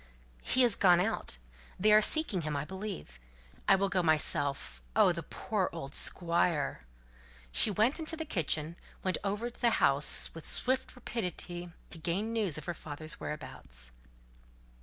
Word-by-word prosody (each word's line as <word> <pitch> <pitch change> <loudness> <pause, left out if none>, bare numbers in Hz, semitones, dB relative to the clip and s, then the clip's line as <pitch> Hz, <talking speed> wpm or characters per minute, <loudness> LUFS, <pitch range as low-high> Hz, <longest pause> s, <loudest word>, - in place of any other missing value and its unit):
"He 255 - +3
is 235 -4 +6
gone 180 -3 +5
out. 180 - 0 0.4
They 210 +3 +4
are 215 - +7
seeking 220 - +5
him, 150 -2 -3
I 140 - -3
believe. 190 - -7 0.5
I 195 - +6
will 195 +1 +1
go 190 -2 0
myself. 145 - 0
Oh! - - +5
the - - -4
poor - - -3
old 135 +1 -7
Squire!" 170 - 0 0.6
She - - +4
went 220 - +1
into 325 0 -1
the 320 - -4
kitchen 165 - -1 0.3
went 185 -1 0
over 210 +4 -2
the 235 0 0
house 140 +1 +4
with 165 -2 -10
swift 260 +1 -1
rapidity 180 -7 -5 0.2
to - - -8
gain 195 +8 -2
news 205 -9 0
of 155 - -8
her 175 - -3
father's 155 0 -3
whereabouts. 60 - -5
180 Hz, 155 wpm, -31 LUFS, 150-215 Hz, 0.6 s, are